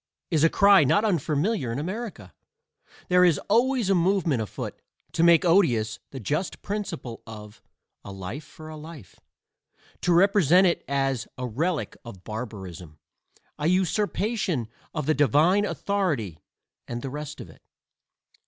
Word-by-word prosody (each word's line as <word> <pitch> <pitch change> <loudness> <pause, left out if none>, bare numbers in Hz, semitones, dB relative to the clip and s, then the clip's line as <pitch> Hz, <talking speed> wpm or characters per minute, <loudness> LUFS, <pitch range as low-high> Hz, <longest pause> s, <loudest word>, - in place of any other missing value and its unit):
is 160 -2 +2
a 165 - +6
cry 200 -3 +6
not 205 +11 +3
unfamiliar 165 - 0
in 115 - -3
America. 180 - -6 0.8
There 180 0 +5
is 170 -5 +4
always 240 +1 +2
a 195 - +3
movement 175 - +2
afoot 105 - -6 0.3
to - - -1
make 170 +1 +5
odious 120 - +2
the 135 - -8
just 150 - -3
principle; 170 - -5
of 105 -1 -11 0.4
"a - - -9
life 95 +9 -7
for 155 +2 -13
a 155 - -8
life" 150 - -12 0.8
to 180 - +1
represent 185 -1 +5
it 175 - +1
as 135 -3 -1
"a 125 - -3
relic 155 +8 -2
of 100 -7 -11
barbarism," 95 -8 -7 0.6
"a 150 - 0
usurpation 190 - 0 0.2
of 155 -3 -3
the 155 - +3
divine 155 - +3
authority," 155 - -2 0.5
and 120 0 -5
the 135 - -4
rest 150 0 -6
of - - -8
it. - - -17
155 Hz, 145 wpm, -25 LUFS, 120-190 Hz, 0.8 s, a